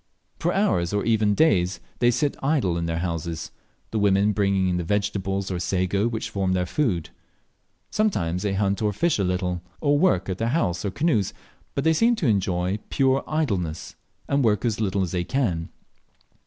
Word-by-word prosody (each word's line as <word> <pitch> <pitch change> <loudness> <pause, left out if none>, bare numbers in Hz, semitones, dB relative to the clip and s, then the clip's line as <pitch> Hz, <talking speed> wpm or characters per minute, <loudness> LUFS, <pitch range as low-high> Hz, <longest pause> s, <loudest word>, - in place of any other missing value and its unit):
For 175 - +1
hours 175 - +1
or 105 - 0
even 110 -2 +3
for - - -2
days 95 - +3 0.2
they 120 - +4
sit 140 +4 +1
idle 135 - +1
in 85 0 -2
their 85 0 -1
houses, 85 -1 -3 0.4
the 110 - 0
women 100 0 +3
bringing 100 -2 +1
in 90 -1 0
the 90 - -1
vegetables 95 0 -1
or 90 - -2
sago 95 +4 0
which 115 -2 -4
form 95 -2 0
their 90 -1 +1
food. 90 - -1 0.8
Sometimes 90 - 0
they 100 -1 -1
hunt 100 0 0
or 105 -1 +1
fish 170 - +1
a - - +2
little, 90 -1 -1 0.2
or 145 -1 +2
work 95 - +2
at 95 -1 -3
their 115 +1 0
houses 90 - -1
or - - +1
canoes, 115 - 0 0.4
but 140 - 0
they 160 +1 +4
seem 230 +8 +3
to 180 - -3
enjoy 95 -3 +1
pure 135 0 +2
idleness, 100 - -2 0.3
and 140 -1 +1
work 105 -1 +2
as 110 -2 0
little 100 -2 +1
as 90 - -3
they 90 -1 -1
can. 90 -8 -1
100 Hz, 190 wpm, -24 LUFS, 90-120 Hz, 0.8 s, they